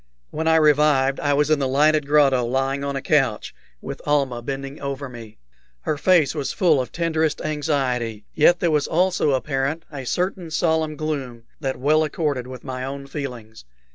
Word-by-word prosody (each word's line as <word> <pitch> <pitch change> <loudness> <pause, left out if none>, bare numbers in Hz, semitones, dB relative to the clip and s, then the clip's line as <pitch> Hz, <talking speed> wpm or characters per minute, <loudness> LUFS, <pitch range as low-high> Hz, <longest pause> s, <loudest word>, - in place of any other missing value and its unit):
When 160 +1 -3
I 160 - +5
revived 150 -3 +3
I 145 -1 +1
was 150 +1 +1
in 155 - +3
the 135 - 0
lighted 150 +2 +3
grotto, 140 -4 +4
lying 135 +3 -1
on 140 0 -3
a 135 - -4
couch, 135 -8 +1 0.3
with - - -6
Almah 135 -5 +1
bending 135 +3 -6
over 140 0 -4
me. 115 -4 -11 0.4
Her 150 - -1
face 150 -1 +3
was 145 -3 -3
full 160 -7 +3
of 125 - -7
tenderest 160 -2 0
anxiety, 130 -8 -2
yet 175 +3 +4
there 170 - +2
was 150 -2 +1
also 180 -4 +2
apparent 135 +4 -1
a 140 -3 -6
certain 180 +1 -2
solemn 160 -1 0
gloom 135 -7 -4 0.2
that 135 -3 -3
well 155 +4 +3
accorded 145 -5 -2
with 130 0 -9
my 130 -1 -5
own 140 +1 -5
feelings. 125 - -7
140 Hz, 175 wpm, -22 LUFS, 135-155 Hz, 0.4 s, I